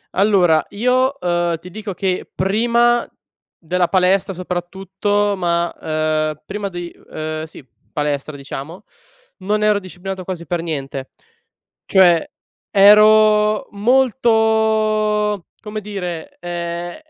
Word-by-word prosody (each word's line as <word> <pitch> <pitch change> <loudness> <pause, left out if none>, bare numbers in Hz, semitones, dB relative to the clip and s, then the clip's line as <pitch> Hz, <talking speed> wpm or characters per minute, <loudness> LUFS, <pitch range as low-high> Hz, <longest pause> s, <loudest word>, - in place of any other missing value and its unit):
Allora 185 -5 +3
io, 255 +5 +1
ehm, 175 -1 0
ti 180 - -11
dico 210 +1 -6
che 185 0 -2
prima 235 +5 +2 0.5
della 175 +1 0
palestra 190 +1 +2
soprattutto 190 +3 -2
ma, 170 -1 0
ehm, 155 -1 -1
prima 205 +1 -4
di 175 -2 -6
ehm, 155 0 -6
sì 155 -4 -14 0.3
palestra, 150 0 -2
diciamo 140 +6 -8 0.6
non 210 +3 -1
ero 210 -1 +3
disciplinato 185 0 -7
quasi 175 -2 -6
per 175 -1 -2
niente. 135 -5 -5 0.8
Cioè, 175 -4 +4 0.4
ero 210 +1 +5
molto 220 -3 +2
come 215 -1 -6
dire, 180 -6 -6
ehm, 175 0 -5
190 Hz, 105 wpm, -19 LUFS, 170-210 Hz, 0.8 s, ero